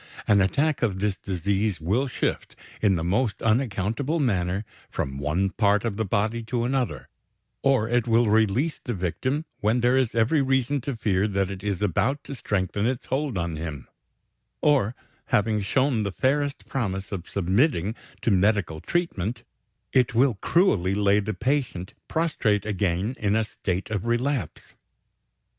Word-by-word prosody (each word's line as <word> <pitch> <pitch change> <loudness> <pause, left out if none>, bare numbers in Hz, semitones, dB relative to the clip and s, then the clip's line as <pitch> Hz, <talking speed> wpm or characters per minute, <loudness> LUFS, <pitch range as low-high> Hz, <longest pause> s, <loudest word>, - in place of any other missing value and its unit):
An 100 -1 +5
attack 145 +10 +1
of 105 -6 +1
this 100 -1 -1
disease 100 0 -1
will 105 - 0
shift, 125 - -2 0.3
in 100 -3 +4
the 80 - -2
most 105 +6 0
unaccountable 115 - 0
manner, 100 - 0 0.2
from 70 0 -3
one 85 +7 0
part 105 +1 +2
of 110 -4 -1
the 110 +1 -1
body 110 +4 0
to 120 +1 -1
another; 125 - -1 0.5
or, 135 -5 +3
it 120 0 +1
will 115 0 +4
release 110 +8 +2
the 120 - -3
victim 130 - -2
when 110 +4 +1
there 120 +2 +3
is 130 -4 +1
every 115 +7 +3
reason 135 +1 +1
to 135 +1 -3
fear 100 -2 +1
that 100 -2 -1
it 95 -1 -7
is 100 -1 -2
about 125 - +1
to - - -7
strengthen 105 -3 -1
its 125 -1 -2
hold 135 -4 -1
on 85 -2 -2
him; 75 -5 -6 0.7
or, 130 -6 +2 0.3
having 105 0 +2
shown 130 +4 +1
the 100 -1 -2
fairest 140 +6 0
promise 95 -7 -3
of 90 -4 -5
submitting 100 - +1 0.3
to 115 - +2
medical 100 -4 +2
treatment, 120 - -2 0.5
it 125 -3 +3
will 130 +2 +4
cruelly 100 - +2
lay 100 0 +3
the 105 +1 -3
patient 125 -9 -1
prostrate 115 - 0
again 100 +2 -1
in 105 0 +1
a 110 - +3
state 95 -2 -4
of 105 +1 -2
relapse. 125 +2 -2
110 Hz, 155 wpm, -25 LUFS, 95-130 Hz, 0.7 s, An